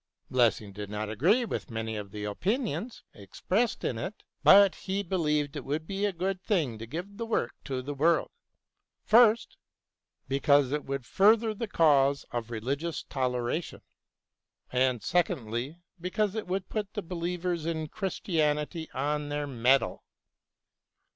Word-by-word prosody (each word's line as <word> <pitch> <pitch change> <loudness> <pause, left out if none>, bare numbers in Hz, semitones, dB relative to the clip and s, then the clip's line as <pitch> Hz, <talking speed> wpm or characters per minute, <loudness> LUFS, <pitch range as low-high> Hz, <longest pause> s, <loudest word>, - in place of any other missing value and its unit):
Lessing 115 -5 +2
did 105 0 -7
not 105 0 -3
agree 185 - +3
with 215 - -4
many 110 -1 -3
of 105 -2 -5
the 105 +1 -7
opinions 205 - -2
expressed 180 - -1
in 115 - -1
it, 190 - -6 0.2
but 200 -1 +8
he 195 +1 -3
believed 150 -6 0
it 145 - -4
would 150 +3 -3
be 195 +3 -2
a 205 - +1
good 185 +1 -2
thing 155 - 0
to 115 - -7
give 180 - -6
the 230 - -3
work 210 - 0
to 130 -2 -3
the 145 +3 -4
world, 160 +4 +2 0.7
first, 230 0 +5 0.7
because 140 0 +3
it 150 0 -2
would 135 -2 -4
further 220 - +4
the 225 +2 -4
cause 140 -6 +3
of 120 -1 -3
religious 140 +9 -3
toleration; 125 +4 -2 0.9
and, 125 -3 +1
secondly, 140 -5 -1 0.2
because 195 +3 -1
it 220 -3 -4
would 185 0 -2
put 210 -2 -4
the 205 - -3
believers 175 -1 -3
in 160 -2 -2
Christianity 160 -4 -1
on 145 +2 -1
their 145 0 -2
mettle. 130 0 +2
150 Hz, 145 wpm, -29 LUFS, 125-190 Hz, 0.9 s, but